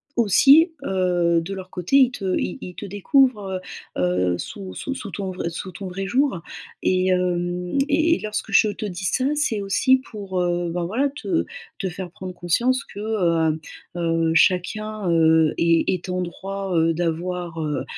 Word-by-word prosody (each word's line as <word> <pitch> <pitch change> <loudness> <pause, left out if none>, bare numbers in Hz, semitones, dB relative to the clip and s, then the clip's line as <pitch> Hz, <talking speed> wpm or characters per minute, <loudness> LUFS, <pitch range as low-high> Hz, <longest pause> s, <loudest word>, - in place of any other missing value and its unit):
aussi, 275 - +6
heu, 175 -3 +2
de 195 +4 -6
leur 185 -1 -9
côté 180 +8 -1
ils 260 -2 +6
te 195 -6 -2
ils - - -3
ils 180 - -8
te - - -7
découvrent, 205 -1 +1 0.4
heu, - - 0
heu, 90 0 +1
sous 190 - -7
sous 275 - -4
sous 255 -6 -7
ton 195 +1 -4
vrai 180 -2 -3
sous 185 +2 -6
ton 190 +2 -7
vrai 195 +2 -4
jour. 255 -2 +1 0.4
Et, 185 0 +2
hem, 180 +2 0
et 320 +3 +3
et - - 0
lorsque 215 0 -4
je 215 - +5
te 210 - -5
dis 185 -1 -5
ça, 255 - +1
c'est 265 -8 0
aussi 260 +7 +3
pour, 195 -4 -4
heu, 175 -1 0
ben, 175 +1 -2
voilà, 255 +10 0
te 330 +5 -2 0.3
te 190 - -2
faire 180 0 -7
prendre 185 -1 -8
conscience 245 +11 +1
que, 205 - -11
heu, 170 -7 +1 0.4
heu, 165 -1 +1
chacun, 205 +3 +1
heu, 160 -1 +4
est 170 -1 +3
est 185 0 -3
en 180 0 -1
droit, 195 +2 -5
heu, 165 0 +3
d'avoir, 170 0 -3
heu, 150 -2 -2
185 Hz, 180 wpm, -23 LUFS, 175-215 Hz, 0.4 s, aussi